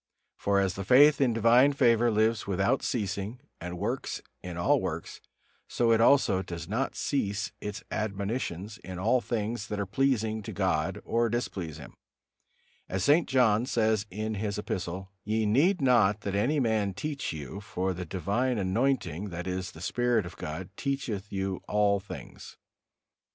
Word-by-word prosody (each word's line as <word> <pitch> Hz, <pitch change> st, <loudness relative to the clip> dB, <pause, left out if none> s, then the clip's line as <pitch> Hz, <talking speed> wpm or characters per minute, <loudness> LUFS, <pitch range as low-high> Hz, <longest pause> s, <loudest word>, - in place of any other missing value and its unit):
For 100 Hz, 0 st, +1 dB
as 95 Hz, -2 st, +1 dB
the 100 Hz, -, -5 dB
faith 140 Hz, +8 st, +6 dB
in 130 Hz, -3 st, +4 dB
divine 120 Hz, +5 st, +5 dB
favor 120 Hz, -3 st, +4 dB
lives 110 Hz, 0 st, +1 dB
without 100 Hz, +7 st, +1 dB
ceasing 105 Hz, +1 st, -3 dB, 0.2 s
and 90 Hz, +1 st, -6 dB
works 115 Hz, +8 st, -2 dB, 0.2 s
in 90 Hz, -1 st, -6 dB
all 85 Hz, -, +3 dB
works, -, -, -5 dB, 0.5 s
so 120 Hz, -1 st, +1 dB
it 115 Hz, 0 st, +4 dB
also 115 Hz, -7 st, +4 dB
does 85 Hz, -2 st, -7 dB
not 120 Hz, +8 st, -1 dB
cease 105 Hz, -7 st, -1 dB
its 105 Hz, 0 st, -5 dB
admonitions 100 Hz, -1 st, -3 dB
in 95 Hz, -1 st, -8 dB
all 115 Hz, +7 st, +2 dB
things 110 Hz, -2 st, -3 dB
that 105 Hz, -1 st, -3 dB
are 100 Hz, -, 0 dB
pleasing 110 Hz, -1 st, 0 dB
to -, -, -7 dB
God 95 Hz, -2 st, 0 dB
or 115 Hz, 0 st, +1 dB
displease 95 Hz, -9 st, -3 dB
Him; 70 Hz, -, -11 dB, 1.0 s
as 95 Hz, 0 st, -1 dB
St. 155 Hz, +7 st, +4 dB
John 125 Hz, -3 st, +3 dB
says 110 Hz, -3 st, +1 dB
in 110 Hz, +3 st, -3 dB
his 105 Hz, 0 st, -2 dB
Epistle: 95 Hz, -1 st, -4 dB
"Ye 110 Hz, +1 st, 0 dB
need 150 Hz, -, +3 dB
not 110 Hz, -6 st, +4 dB
that 100 Hz, -2 st, -3 dB
any 125 Hz, +10 st, +1 dB
man 110 Hz, -6 st, +1 dB
teach 145 Hz, +6 st, -3 dB
you: 75 Hz, +4 st, -6 dB
for 95 Hz, -2 st, -2 dB
the 90 Hz, +1 st, -5 dB
divine 100 Hz, +9 st, -1 dB
anointing, 100 Hz, -, 0 dB
that 90 Hz, 0 st, -5 dB
is, 95 Hz, 0 st, -3 dB
the 80 Hz, -, -12 dB
Spirit 120 Hz, +1 st, +1 dB
of 85 Hz, -, -9 dB
God, 90 Hz, +5 st, -6 dB
teacheth 120 Hz, -8 st, -3 dB
you 95 Hz, -1 st, -2 dB
of -, -, -16 dB
all 105 Hz, -1 st, +2 dB
things." 100 Hz, -, -10 dB
105 Hz, 165 wpm, -29 LUFS, 95-120 Hz, 1.0 s, faith